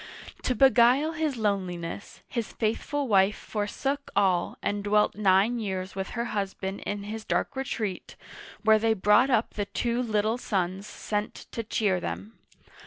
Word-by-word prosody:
To 255 Hz, -, 0 dB
beguile 265 Hz, +4 st, +5 dB
his 310 Hz, -5 st, -1 dB
loneliness, 190 Hz, -4 st, -3 dB
his 235 Hz, -4 st, -4 dB
faithful 265 Hz, +6 st, -1 dB
wife 195 Hz, -1 st, +4 dB
forsook 270 Hz, +7 st, -3 dB
all 190 Hz, -3 st, +2 dB
and 205 Hz, 0 st, -1 dB
dwelt 210 Hz, +1 st, +3 dB
nine 205 Hz, +3 st, +3 dB
years 190 Hz, -3 st, -3 dB
with 190 Hz, 0 st, -3 dB
her 235 Hz, -, 0 dB
husband 195 Hz, -1 st, -3 dB
in 205 Hz, -1 st, -3 dB
his 215 Hz, +2 st, -6 dB
dark -, -, -1 dB
retreat, 220 Hz, -8 st, -4 dB, 0.5 s
where 220 Hz, 0 st, +6 dB
they 225 Hz, 0 st, +2 dB
brought 210 Hz, +6 st, +4 dB
up 235 Hz, -3 st, +1 dB
the 205 Hz, -, -2 dB
two 235 Hz, +4 st, -1 dB
little 220 Hz, 0 st, 0 dB
sons 190 Hz, -2 st, -2 dB
sent 210 Hz, 0 st, -3 dB, 0.2 s
to 230 Hz, -, -3 dB
cheer 210 Hz, -4 st, 0 dB
them. 210 Hz, +4 st, -5 dB
210 Hz, 150 wpm, -27 LUFS, 195-235 Hz, 0.5 s, where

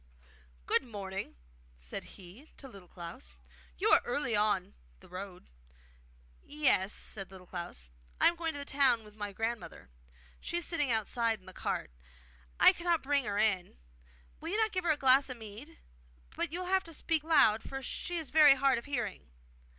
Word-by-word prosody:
'Good -, -, +3 dB
morning!' 195 Hz, -, -6 dB, 0.4 s
said -, -, -8 dB
he 195 Hz, -, -14 dB
to 275 Hz, -, -9 dB
Little 195 Hz, -7 st, -13 dB
Klaus. 170 Hz, -, -9 dB, 0.4 s
'You -, -, +1 dB
are -, -, +7 dB
early 240 Hz, -2 st, 0 dB
on 210 Hz, -, +1 dB, 0.3 s
the -, -, -17 dB
road.' 185 Hz, 0 st, -8 dB, 0.9 s
'Yes,' 275 Hz, -10 st, +1 dB
said 195 Hz, -2 st, -5 dB
Little 185 Hz, -1 st, -12 dB
Klaus. 170 Hz, -, -6 dB, 0.3 s
'I -, -, +7 dB
am 340 Hz, -, -4 dB
going 330 Hz, -1 st, -2 dB
to -, -, -5 dB
the 285 Hz, -, -5 dB
town 270 Hz, -5 st, +3 dB
with 210 Hz, -1 st, -15 dB
my 205 Hz, -1 st, -5 dB
grandmother. 225 Hz, -, -5 dB, 0.5 s
She 345 Hz, -, -3 dB
is 345 Hz, -, -1 dB
sitting 295 Hz, -5 st, 0 dB
outside 225 Hz, 0 st, 0 dB
in 185 Hz, -, -24 dB
the 185 Hz, -, -11 dB
cart; -, -, -3 dB, 0.7 s
I -, -, +8 dB
cannot 340 Hz, -2 st, 0 dB
bring 280 Hz, -1 st, +1 dB
her 200 Hz, 0 st, -2 dB
in. 195 Hz, -, +1 dB, 0.6 s
Will 325 Hz, -, -6 dB
you 405 Hz, -, -1 dB
not 440 Hz, -1 st, +2 dB
give 370 Hz, -3 st, -2 dB
her -, -, +1 dB
a 305 Hz, -, +1 dB
glass 265 Hz, 0 st, +5 dB
of 255 Hz, -, -6 dB
mead? 225 Hz, +9 st, -10 dB, 0.6 s
But 340 Hz, -2 st, -2 dB
you 350 Hz, +3 st, -4 dB
will -, -, -4 dB
have 380 Hz, +1 st, +2 dB
to 330 Hz, -, -9 dB
speak 320 Hz, 0 st, 0 dB
loud, 280 Hz, -9 st, +5 dB
for 270 Hz, +3 st, -7 dB
she 350 Hz, +7 st, -4 dB
is 320 Hz, -4 st, -5 dB
very 300 Hz, -3 st, +8 dB
hard 270 Hz, -2 st, +3 dB
of -, -, -13 dB
hearing. 240 Hz, -, -4 dB
240 Hz, 185 wpm, -32 LUFS, 200-305 Hz, 0.9 s, I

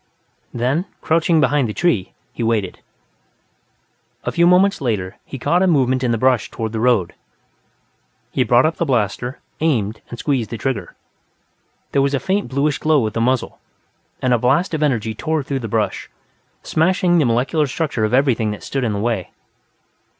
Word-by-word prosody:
Then, 130 Hz, +9 st, 0 dB
crouching 165 Hz, 0 st, +2 dB
behind 145 Hz, -4 st, +2 dB
the 105 Hz, -, -5 dB
tree, 120 Hz, -, 0 dB, 0.2 s
he -, -, -6 dB
waited. 110 Hz, -5 st, -1 dB, 1.4 s
A -, -, -2 dB
few 170 Hz, 0 st, +3 dB
moments 185 Hz, +1 st, +4 dB
later, 105 Hz, -8 st, -2 dB
he 135 Hz, -, -7 dB
caught 175 Hz, +7 st, +1 dB
a 190 Hz, -, +3 dB
movement 130 Hz, -5 st, +2 dB
in 125 Hz, -, +1 dB
the 115 Hz, -, +1 dB
brush 130 Hz, +1 st, +2 dB
toward 110 Hz, -2 st, -4 dB
the 110 Hz, -, -3 dB
road. 115 Hz, -7 st, +2 dB, 1.2 s
He 130 Hz, -, +1 dB
brought 120 Hz, +3 st, +4 dB
up 160 Hz, +1 st, 0 dB
the -, -, 0 dB
blaster, 125 Hz, 0 st, -1 dB, 0.2 s
aimed 110 Hz, -9 st, 0 dB
and 120 Hz, -, -7 dB
squeezed 130 Hz, -4 st, -1 dB
the 115 Hz, -, -5 dB
trigger. 110 Hz, -6 st, -3 dB, 1.0 s
There 140 Hz, -, +2 dB
was 140 Hz, +1 st, +1 dB
a -, -, 0 dB
faint 195 Hz, +9 st, -1 dB
bluish 140 Hz, +1 st, 0 dB
glow 155 Hz, -6 st, +2 dB
at 110 Hz, -, -3 dB
the 115 Hz, -, -1 dB
muzzle, 125 Hz, +1 st, 0 dB, 0.6 s
and 130 Hz, -1 st, +3 dB
a 120 Hz, -, +3 dB
blast 135 Hz, +10 st, +1 dB
of 155 Hz, -, -1 dB
energy 115 Hz, -7 st, 0 dB
tore 155 Hz, +6 st, -2 dB
through 135 Hz, 0 st, -3 dB
the 115 Hz, -, -5 dB
brush, 110 Hz, 0 st, -2 dB, 0.5 s
smashing 175 Hz, +1 st, +2 dB
the 150 Hz, -, +3 dB
molecular 130 Hz, +6 st, +1 dB
structure 145 Hz, -5 st, -2 dB
of 110 Hz, -, +1 dB
everything 125 Hz, -4 st, +2 dB
that 105 Hz, -, -6 dB
stood 135 Hz, -1 st, -2 dB
in 115 Hz, -3 st, 0 dB
the 100 Hz, -, -2 dB
way. 110 Hz, -4 st, -1 dB
130 Hz, 180 wpm, -19 LUFS, 115-150 Hz, 1.4 s, moments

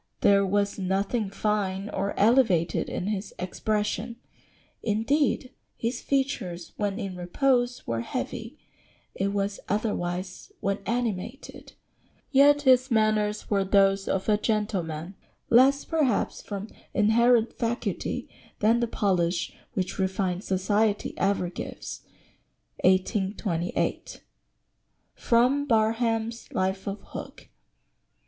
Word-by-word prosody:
There 200 Hz, 0 st, +5 dB
was 200 Hz, +1 st, 0 dB
nothing 195 Hz, +3 st, 0 dB
fine 200 Hz, -1 st, -1 dB
or 200 Hz, 0 st, -2 dB
elevated 205 Hz, -8 st, +3 dB
in -, -, -3 dB
his 205 Hz, -1 st, -3 dB
expression; 210 Hz, +5 st, -2 dB, 0.7 s
indeed, 255 Hz, +5 st, +1 dB, 0.3 s
his 235 Hz, +1 st, -2 dB
features 195 Hz, -11 st, -2 dB
when 205 Hz, -1 st, -1 dB
in 190 Hz, -2 st, -4 dB
repose 245 Hz, +7 st, 0 dB
were 115 Hz, 0 st, -2 dB
heavy; -, -, -5 dB, 0.6 s
it 195 Hz, -, -1 dB
was 200 Hz, 0 st, -2 dB
otherwise 185 Hz, -3 st, -2 dB
when 200 Hz, 0 st, -1 dB
animated; 235 Hz, +1 st, -3 dB, 0.6 s
yet 290 Hz, +1 st, +6 dB
his 255 Hz, -1 st, +5 dB
manners 215 Hz, -2 st, +1 dB
were 200 Hz, -1 st, +3 dB
those 195 Hz, 0 st, +3 dB
of 190 Hz, -, -1 dB
a 210 Hz, -1 st, +3 dB
gentleman, 190 Hz, -7 st, -2 dB, 0.4 s
less, 270 Hz, +4 st, +5 dB
perhaps, 295 Hz, -9 st, 0 dB
from 205 Hz, +1 st, -6 dB, 0.3 s
inherent 235 Hz, +2 st, +4 dB
faculty 235 Hz, +1 st, -2 dB, 0.3 s
than 225 Hz, +3 st, +3 dB
the 235 Hz, -, +1 dB
polish 180 Hz, -6 st, 0 dB, 0.2 s
which 185 Hz, 0 st, -3 dB
refined 190 Hz, -1 st, -1 dB
society 205 Hz, +3 st, +1 dB
ever 195 Hz, -2 st, +1 dB
gives." 175 Hz, -, -7 dB, 0.8 s
1828. 185 Hz, -2 st, 0 dB, 0.9 s
[Sidenote: 255 Hz, +5 st, +2 dB
Barham's 225 Hz, 0 st, 0 dB
Life 190 Hz, +1 st, -1 dB
of 200 Hz, +1 st, -4 dB
Hook. -, -, -9 dB
210 Hz, 105 wpm, -27 LUFS, 190-235 Hz, 0.9 s, yet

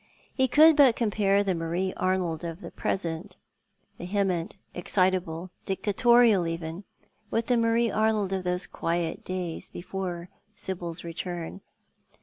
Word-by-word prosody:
He 260 Hz, -1 st, +2 dB
could 310 Hz, +5 st, +7 dB
but 275 Hz, -6 st, +6 dB
compare 205 Hz, -3 st, +2 dB
the 195 Hz, -2 st, 0 dB
IVlarie 170 Hz, +3 st, -2 dB
Arnold 180 Hz, -4 st, -1 dB
of 170 Hz, +2 st, -5 dB
the -, -, -8 dB
present 175 Hz, +1 st, -3 dB, 0.3 s
— -, -, -42 dB
vehement, 185 Hz, -2 st, -1 dB, 0.2 s
excitable, 180 Hz, -1 st, 0 dB
dictatorial 210 Hz, 0 st, +4 dB
even 165 Hz, +3 st, -5 dB, 0.2 s
— 215 Hz, -, -40 dB
with 225 Hz, 0 st, 0 dB
tlie 245 Hz, -2 st, +2 dB
Marie 230 Hz, 0 st, +2 dB
Arnold 215 Hz, -2 st, +1 dB
of 190 Hz, -1 st, -2 dB
those 180 Hz, 0 st, -1 dB
quiet 165 Hz, -1 st, -2 dB
days 180 Hz, -3 st, -4 dB
before 180 Hz, -1 st, -5 dB, 0.3 s
Sibil's 175 Hz, -4 st, -4 dB
return. 170 Hz, +2 st, -5 dB
185 Hz, 135 wpm, -27 LUFS, 170-210 Hz, 0.3 s, could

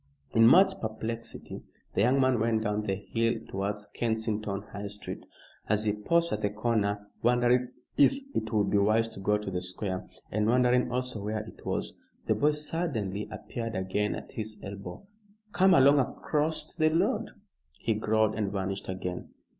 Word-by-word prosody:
In 115 Hz, 0 st, +6 dB
much 190 Hz, +8 st, +6 dB
perplexity 110 Hz, +1 st, -4 dB, 0.3 s
the -, -, +1 dB
young 125 Hz, +5 st, +4 dB
man 130 Hz, -3 st, +3 dB
went 110 Hz, 0 st, +1 dB
down 105 Hz, 0 st, 0 dB
the 100 Hz, -2 st, -1 dB
hill 115 Hz, +4 st, 0 dB
towards 100 Hz, +2 st, -3 dB
Kensington 110 Hz, -3 st, -2 dB
High 100 Hz, 0 st, -4 dB
Street. 105 Hz, +1 st, -5 dB, 0.5 s
As 110 Hz, 0 st, +2 dB
he 105 Hz, -, +2 dB
paused 170 Hz, +11 st, +1 dB
at 105 Hz, -, -2 dB
the 105 Hz, -, +1 dB
corner 105 Hz, -1 st, 0 dB
wondering 120 Hz, +1 st, +3 dB, 0.3 s
if 140 Hz, -, +6 dB, 0.2 s
it 110 Hz, -, -2 dB
would 105 Hz, -2 st, +1 dB
be 105 Hz, -, +4 dB
wise 110 Hz, +3 st, +3 dB
to -, -, -9 dB
go 105 Hz, +2 st, +2 dB
to 105 Hz, -2 st, -5 dB
the 90 Hz, -1 st, -2 dB
Square, 90 Hz, +1 st, -4 dB, 0.2 s
and 105 Hz, +1 st, +1 dB
wondering 125 Hz, +1 st, +3 dB
also 125 Hz, -3 st, -2 dB
where 105 Hz, +1 st, -2 dB
it 110 Hz, -, -13 dB
was, -, -, -2 dB, 0.3 s
the -, -, +3 dB
boy 150 Hz, +1 st, +2 dB
suddenly 140 Hz, -, -2 dB
appeared 115 Hz, -2 st, -5 dB
again 95 Hz, +2 st, -1 dB
at -, -, -8 dB
his 110 Hz, -1 st, -5 dB
elbow. 100 Hz, -, -8 dB, 0.5 s
"Come 190 Hz, 0 st, +5 dB
along 140 Hz, +1 st, +6 dB
acrost 150 Hz, +5 st, -1 dB
the 155 Hz, 0 st, +5 dB
road," 165 Hz, +2 st, +1 dB, 0.5 s
he 115 Hz, -, +1 dB
growled, 110 Hz, 0 st, +2 dB
and 105 Hz, -3 st, -1 dB
vanished 95 Hz, -1 st, -3 dB
again. 90 Hz, -1 st, -4 dB
110 Hz, 170 wpm, -29 LUFS, 105-125 Hz, 0.5 s, In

